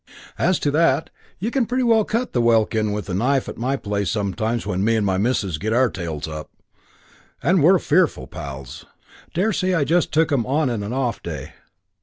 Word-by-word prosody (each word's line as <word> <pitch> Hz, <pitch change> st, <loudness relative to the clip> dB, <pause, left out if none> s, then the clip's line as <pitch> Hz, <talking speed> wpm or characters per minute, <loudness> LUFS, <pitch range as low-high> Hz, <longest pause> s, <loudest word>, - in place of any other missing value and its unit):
As 185 Hz, +1 st, +3 dB
to 145 Hz, -, +1 dB
that, 155 Hz, -1 st, +2 dB, 0.3 s
you 220 Hz, +7 st, -3 dB
can 255 Hz, -4 st, +1 dB
pretty 255 Hz, +2 st, 0 dB
well 225 Hz, -2 st, +4 dB
cut 240 Hz, +3 st, -2 dB
the 120 Hz, -, +2 dB
welkin 110 Hz, -2 st, +2 dB
with 105 Hz, 0 st, -4 dB
a 95 Hz, -, -4 dB
knife 130 Hz, +7 st, +1 dB
at -, -, -6 dB
my 130 Hz, +4 st, 0 dB
place 100 Hz, -6 st, -2 dB
sometimes 105 Hz, +5 st, -1 dB
when 95 Hz, -2 st, -1 dB
me 115 Hz, +2 st, +3 dB
and 110 Hz, -2 st, +1 dB
my 95 Hz, -1 st, +1 dB
missus 100 Hz, -7 st, 0 dB
get 110 Hz, +6 st, -1 dB
our 125 Hz, 0 st, +3 dB
tails 80 Hz, -5 st, -5 dB
up; 75 Hz, 0 st, -7 dB, 0.9 s
and 180 Hz, 0 st, +3 dB
we're 180 Hz, +6 st, +6 dB
fearful 160 Hz, -, +1 dB
pals. 70 Hz, -2 st, -8 dB, 0.5 s
Daresay 185 Hz, 0 st, +1 dB
I 160 Hz, -, +2 dB
just 170 Hz, +4 st, +1 dB
took 160 Hz, 0 st, +2 dB
'em 135 Hz, -5 st, +2 dB
on 140 Hz, 0 st, +1 dB
an 105 Hz, -2 st, -3 dB
off 125 Hz, -3 st, -1 dB
day. 75 Hz, -6 st, -7 dB
120 Hz, 195 wpm, -22 LUFS, 100-160 Hz, 0.9 s, we're